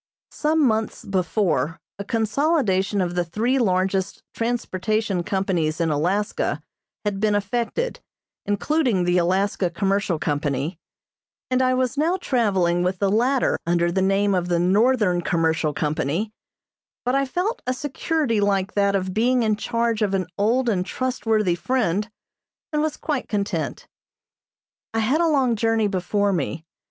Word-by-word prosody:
Some 305 0 +1
months 220 -2 -1
before 185 -4 0 0.2
a - - -3
consolidation 220 - +1
of 175 -1 -1
the 175 0 +1
three 225 +10 0
largest 190 -2 0
transportation 215 -4 -1
companies 180 -5 -1
in 165 -2 +1
Alaska 180 +8 -1 0.4
had 205 -2 -1
been 210 0 +2
effected, 235 - -2 0.5
including 225 - +1
the 175 0 +2
Alaska 185 +1 +1
Commercial 195 0 0
Company, 145 +3 -2 0.7
and 255 0 +3
I 255 0 +3
was 255 +2 0
now 335 +5 +2
traveling 195 - +1
with 180 +1 0
the 195 +1 +1
latter 250 +5 +2
under 170 0 +2
the 190 - 0
name 195 +1 +2
of 180 -2 0
the 175 -1 +1
Northern 195 +1 +3
Commercial 160 -2 +1
Company, 155 +7 -2 0.7
but 250 - +1
I 275 0 +3
felt 360 - -2
a 255 - +1
security 290 -4 -1
like 200 -1 +1
that 200 -1 +2
of 185 -1 -1
being 245 +3 +2
in 215 -1 +2
charge 230 +1 -1
of 200 -2 +1
an 185 -1 0
old 235 +5 +1
and 190 -6 +1
trustworthy 220 -4 0
friend, 210 0 0 0.6
and 300 - +2
was 310 -1 -1
quite 295 -5 -3
content. 200 -2 -2 1.1
I - - +2
had 265 +9 +2
a 340 - +3
long 265 -6 +2
journey 225 0 +1
before 200 +1 0
me. 160 -1 -3
205 Hz, 145 wpm, -23 LUFS, 180-240 Hz, 1.1 s, and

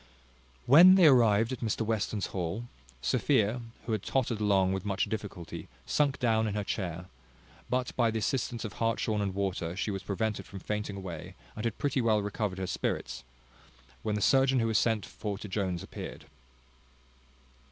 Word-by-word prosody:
When 175 +8 +9
they 185 -3 +6
arrived 115 -5 +5
at 130 - -4
Mr 115 -1 -2
Western's 110 -2 -1
hall, 95 +5 -3 0.4
Sophia, 110 +3 +2 0.2
who 115 - -3
had 110 -3 0
tottered 120 -2 -1
along 95 -2 +3
with 95 -1 -3
much 100 -1 0
difficulty, 100 -6 -6 0.2
sunk 140 -2 +1
down 110 -3 +2
in 105 - -3
her 105 - -1
chair; 90 -4 -3 0.6
but 125 0 -1
by 120 -2 +3
the 110 - -2
assistance 120 +1 -1
of 105 - -6
hartshorn 115 -2 0
and 100 -2 -2
water, 90 -4 -2
she 105 - -1
was 95 -1 -4
prevented 105 +1 -2
from 100 - -9
fainting 105 +1 -4
away, 95 -3 -7 0.2
and 110 - -4
had 115 -2 -1
pretty 140 -2 0
well 110 -3 +2
recovered 105 -2 -2
her 95 - -2
spirits, 80 - -3 0.8
when 105 - -1
the 105 - -2
surgeon 135 +3 +4
who 115 - +1
was 110 -1 +3
sent 110 -3 +1
for 105 -2 -5
to 105 - -8
Jones 95 -3 -2
appeared. - - -8
105 Hz, 175 wpm, -30 LUFS, 100-115 Hz, 0.8 s, When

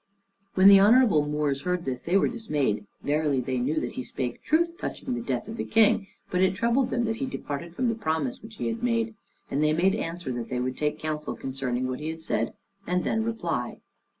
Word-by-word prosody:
When 190 +1 +7
the 200 -1 +10
honorable 205 - +5
Moors 150 -2 0
heard 180 0 -1
this, 125 -2 -3
they 180 +3 +2
were - - +3
dismayed; 145 - -1 0.2
verily 145 -2 +1
they 130 0 -1
knew 145 +6 0
that - - -3
he 125 - -5
spake 125 -1 -4
truth 335 +2 +1
touching 270 -7 -4
the 240 - -2
death 235 - -2
of 225 +1 -6
the - - -1
King, 220 -2 +3 0.2
but 180 - +1
it 190 0 +3
troubled 235 +5 +2
them 240 -1 0
that 225 0 -1
he 270 - -2
departed 165 - -5
form 255 - 0
the 230 - +2
promise 160 - -2
which 220 0 -11
he - - -4
had 230 0 -2
made; 230 -1 0 0.4
and 145 +3 +1
they 155 0 +3
made 185 +4 +3
answer 170 -7 -3
that 120 -2 -4
they 125 - -1
would 130 +1 -2
take 150 0 -1
counsel 155 -1 -3
concerning 130 -1 -2
what 130 0 -3
he 155 +1 -4
had 160 0 -6
said, 115 -6 -1 0.3
and 180 0 +1
then 225 0 0
reply. 175 - -2
170 Hz, 225 wpm, -27 LUFS, 140-225 Hz, 0.4 s, the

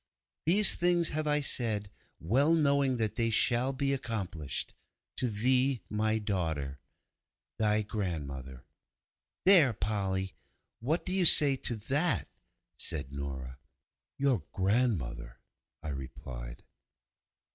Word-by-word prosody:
These 200 +5 +6
things 175 -1 +1
have 155 0 -3
I 150 0 +1
said, 110 -7 -2 0.3
well 135 - +2
knowing 140 -4 +2
that 110 -3 -1
they 115 0 0
shall 120 +3 +2
be 135 +1 -1
accomplished._ 95 - -4 0.4
'To 125 - -1
thee, 125 +4 +1
my 110 +1 0
daughter! 80 -10 -3 0.8
'THY 105 0 +2
GRANDMOTHER.' 70 - -5 0.8
'There, 170 -10 +6
Polly, 95 -1 -2 0.5
what 150 +9 -1
do 185 - 0
you 185 -3 +4
say 145 -3 +9
to 120 - -4
that?' 140 +10 0 0.5
said 70 -6 -3
Nora. 65 -2 -7 0.6
'Your 135 -8 +1
grandmother!' 95 - -1 0.5
I 80 - -5
replied. 65 -3 -8
110 Hz, 110 wpm, -30 LUFS, -, 0.8 s, say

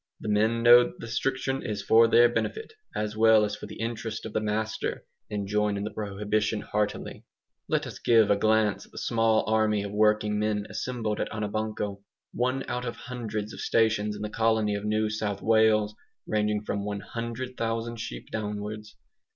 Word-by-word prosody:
The 110 - -5
men 110 +3 +2
know 120 +1 +8
that - - -9
the - - -7
restriction 135 +3 -1
is 105 -3 -4
for 115 +3 +6
their 120 +1 +6
benefit, 440 - -3 0.2
as 105 0 -2
well 110 -1 +5
as 105 - -3
for - - -9
the - - -10
interest 115 -1 -4
of 110 - -7
the - - +1
master, 110 +1 -2 0.2
and 100 -1 -3
join 105 0 +1
in 100 - -3
the 105 - -4
prohibition 105 +1 -1
heartily. 105 0 -3 0.4
Let - - 0
us - - -8
give 110 -3 +4
a - - +5
glance 110 0 +2
at - - -26
the - - -12
small 115 -1 +2
army 110 -2 +2
of 100 - -5
working 105 0 +2
men 105 -1 0
assembled 115 -4 -3
at - - -1
Anabanco 105 -1 -3 0.3
one 130 +2 -1
out 125 0 -3
of 120 - -4
hundreds 110 -4 -5
of - - -8
stations 110 -2 +1
in 105 - -6
the 105 - -3
colony 110 -2 +2
of 100 0 -3
New 110 0 +1
South 105 -2 -3
Wales, 110 -1 +4 0.3
ranging 105 0 0
from 100 -1 -3
100,000 115 +2 -4
sheep 110 0 -7
downwards. 105 0 -5
110 Hz, 180 wpm, -27 LUFS, 105-115 Hz, 0.4 s, know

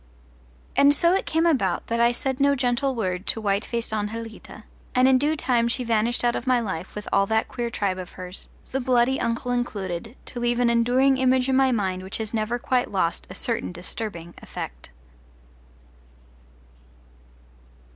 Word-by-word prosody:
And 280 +1 +6
so 340 +3 +4
it 385 - 0
came 325 +1 +1
about 210 - +1
that 230 0 -1
I 235 0 +5
said 265 +2 -2
no 280 0 +4
gentle 260 +1 0
word 185 -4 -2
to - - +1
white 200 -1 0
faced 235 -1 -2
Anjelita, 220 +1 -5 0.3
and 255 +1 +5
in 260 -1 +5
due 300 +3 +2
time 240 -5 +1
she 245 +2 -1
vanished 230 +1 +1
out 240 0 +2
of 245 - -4
my 255 -1 +4
life 190 -6 -5
with 210 0 -6
all 195 0 +4
that 220 +1 +1
queer 240 -2 -3
tribe 195 -4 -1
of 180 - -8
hers, 180 0 -7 0.2
the 270 - 0
bloody 250 +1 +2
uncle 235 +1 -1
included, 220 -3 -3
to 245 - -7
leave 240 0 +1
an 240 -1 +3
enduring 250 +3 +3
image 260 0 +3
in 265 - +3
my 265 0 +4
mind 190 -5 -1
which 190 +2 -4
has 220 -1 -5
never 220 +2 0
quite 250 +1 0
lost 180 -4 -1
a - - -8
certain 230 -4 -2
disturbing 175 -1 -5
effect. - - -7
235 Hz, 175 wpm, -24 LUFS, 205-255 Hz, 0.3 s, And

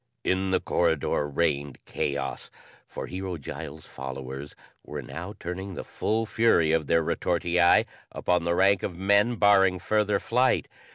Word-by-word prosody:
In 95 +1 0
the 95 - +2
corridor 75 -1 0
reigned 70 -2 -1
chaos, 70 -2 -3 0.4
for - - -6
Hero 95 -1 -5
Giles' 80 +2 -8
followers 65 +1 -7 0.3
were - - -6
now 90 +5 -7
turning 95 +2 -5
the - - -5
full 110 +1 -1
fury 110 -8 +3
of 80 -3 +1
their 85 +2 +3
retortii 85 +1 +2 0.3
upon 90 -1 0
the 85 0 +1
rank 95 +1 +4
of 85 - -4
men 100 +5 +3
barring 100 -3 +4
further 105 +2 +1
flight. 125 +5 +1
90 Hz, 145 wpm, -26 LUFS, 80-100 Hz, 0.4 s, rank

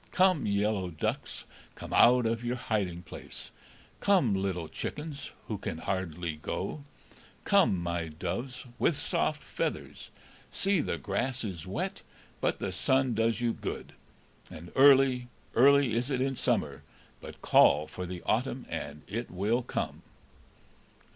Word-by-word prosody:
Come, 185 - +3
yellow 100 -2 +1
ducks, 80 -3 -3 0.3
Come - - -8
out 125 0 +6
of 115 +1 0
your 120 +1 -1
hiding 100 -8 -2
place; 80 - -10 0.5
Come, 180 - +3
little 95 -4 -1
chickens, 150 - -5 0.2
Who 105 -3 -3
can 80 - -4
hardly 85 -3 -3
go; 140 - -4 0.6
Come, 195 - +4
my 85 -1 -2
doves 125 - -5
With - - +2
soft - - -1
feathers; - - -4 0.4
See, 195 -2 +1
the - - -2
grass 120 +6 -2
is 95 -6 -5
wet, 95 - -3 0.4
But - - 0
the 100 - -3
sun 130 +7 +2
does 115 +1 +1
you 120 -1 +1
good; - - -6 0.6
And 85 +2 -10
early, 135 -2 +6 0.3
early 140 0 +5
is 120 +4 0
it 130 -3 0
in 135 +1 0
summer, 75 - 0 0.4
But - - -11
call 75 - +5
for 90 +3 -6
the 90 -1 -7
autumn, - - 0
and 70 +1 -5
it 115 +6 -4
will 105 +7 0
come." 125 - -4
115 Hz, 140 wpm, -30 LUFS, 90-130 Hz, 0.6 s, out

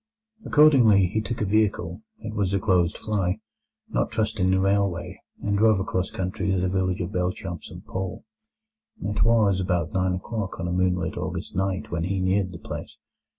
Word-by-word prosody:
Accordingly 125 - +6
he 110 +5 -1
took 115 +1 -4
a - - +2
vehicle—it 110 - -1
was 100 -2 0
a - - +2
closed 90 -3 +2
fly—not 95 - -3
trusting 105 -4 0
the 95 0 +3
railway 100 -2 0 0.2
and 100 0 +1
drove 110 -1 +4
across 95 -1 -1
country 95 -1 -3
to 95 - +2
the 90 +1 0
village 95 -1 0
of 85 - -3
Belchamp 90 -2 -3
St - - -10
Paul. 95 +3 -5 0.8
It 105 +1 -1
was 110 -5 +4
about 90 -4 -1
nine 95 -1 +1
o'clock 100 +1 -4
on 85 - -2
a - - -2
moonlight 90 -1 0
August - - -4
night 95 +1 -1
when 85 0 -1
he 95 +1 -1
neared 95 0 +1
the 85 - -8
place. - - -7
95 Hz, 170 wpm, -25 LUFS, 90-105 Hz, 0.8 s, Accordingly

